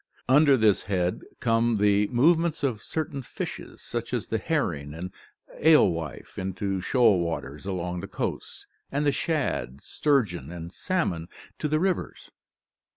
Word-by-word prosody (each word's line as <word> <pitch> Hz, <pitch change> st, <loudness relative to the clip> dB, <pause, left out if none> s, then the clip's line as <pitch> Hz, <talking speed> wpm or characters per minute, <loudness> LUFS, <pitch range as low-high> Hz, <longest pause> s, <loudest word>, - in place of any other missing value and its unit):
Under 140 Hz, +1 st, +6 dB
this 110 Hz, -4 st, +4 dB
head 90 Hz, -3 st, -1 dB, 0.2 s
come 115 Hz, 0 st, +2 dB
the 105 Hz, 0 st, +3 dB
move 145 Hz, +9 st, +4 dB
ments 165 Hz, -2 st, -2 dB
of 120 Hz, -7 st, 0 dB
certain 150 Hz, -1 st, -3 dB
fishes 125 Hz, -, -7 dB
such 120 Hz, +1 st, -3 dB
as 120 Hz, -, -4 dB
the 110 Hz, -, 0 dB
herring 80 Hz, -, -1 dB
and 90 Hz, +3 st, -6 dB, 0.5 s
alewife 85 Hz, -, +2 dB
into 95 Hz, 0 st, -2 dB
shoal 115 Hz, -4 st, +4 dB
waters 80 Hz, -1 st, -4 dB
along 90 Hz, -2 st, -3 dB
the -, -, -6 dB
coasts, -, -, -4 dB, 0.3 s
and 145 Hz, +2 st, 0 dB
the 145 Hz, -, +4 dB
shad, 135 Hz, -, -1 dB
sturgeon, 100 Hz, -, 0 dB
and 85 Hz, 0 st, -7 dB
salmon 95 Hz, -, -1 dB, 0.3 s
to 150 Hz, -, 0 dB
the 155 Hz, +1 st, +1 dB
rivers. 185 Hz, 0 st, -2 dB
110 Hz, 145 wpm, -26 LUFS, 90-145 Hz, 0.5 s, Under